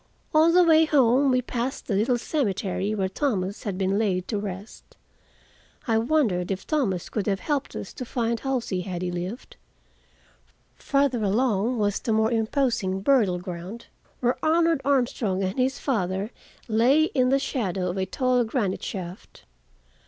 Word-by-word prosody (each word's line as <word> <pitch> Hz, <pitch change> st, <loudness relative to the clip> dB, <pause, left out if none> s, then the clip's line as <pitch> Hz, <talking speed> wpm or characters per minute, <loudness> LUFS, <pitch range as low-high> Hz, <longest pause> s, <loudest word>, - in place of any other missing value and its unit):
On 315 Hz, +2 st, +5 dB
the 360 Hz, +1 st, +6 dB
way 320 Hz, -1 st, +5 dB
home 270 Hz, -2 st, +4 dB
we 255 Hz, -1 st, +2 dB
passed 245 Hz, +2 st, -3 dB
the 215 Hz, -, -2 dB
little 230 Hz, +5 st, +2 dB
cemetery 210 Hz, -, -1 dB
where 190 Hz, -2 st, 0 dB
Thomas 200 Hz, -3 st, -2 dB
had 200 Hz, -3 st, -3 dB
been 195 Hz, +1 st, +1 dB
laid 185 Hz, -4 st, 0 dB
to 210 Hz, -, -1 dB
rest. 200 Hz, +1 st, -8 dB, 0.9 s
I 225 Hz, -1 st, +3 dB
wondered 225 Hz, -, +1 dB
if 195 Hz, -1 st, -3 dB
Thomas 220 Hz, -, -1 dB
could 210 Hz, -2 st, -3 dB
have 195 Hz, -2 st, 0 dB
helped 290 Hz, -3 st, -2 dB
us -, -, -6 dB
to 255 Hz, -, -6 dB
find 235 Hz, -1 st, -1 dB
Halsey, 245 Hz, -8 st, -2 dB
had 180 Hz, -1 st, -5 dB
he 180 Hz, -, -2 dB
lived. 180 Hz, +7 st, -6 dB, 1.2 s
Farther 275 Hz, -4 st, +1 dB
along 225 Hz, +2 st, +1 dB
was 205 Hz, -2 st, 0 dB
the 225 Hz, -, -1 dB
more 220 Hz, +1 st, +2 dB
imposing 225 Hz, -5 st, 0 dB
burial 210 Hz, -7 st, +3 dB
ground, 180 Hz, +5 st, -7 dB, 0.4 s
where 245 Hz, 0 st, 0 dB
Arnold 330 Hz, -1 st, +3 dB
Armstrong 240 Hz, -8 st, 0 dB
and 190 Hz, +6 st, -2 dB
his 260 Hz, +1 st, +1 dB
father 200 Hz, -4 st, -1 dB, 0.4 s
lay 245 Hz, +7 st, +4 dB
in 255 Hz, -1 st, +3 dB
the 270 Hz, -, +4 dB
shadow 195 Hz, -, -2 dB
of 185 Hz, -, -6 dB
a 190 Hz, 0 st, -1 dB
tall 255 Hz, +4 st, +1 dB
granite 220 Hz, -5 st, -1 dB
shaft. 185 Hz, -2 st, -7 dB
225 Hz, 160 wpm, -25 LUFS, 190-265 Hz, 1.2 s, the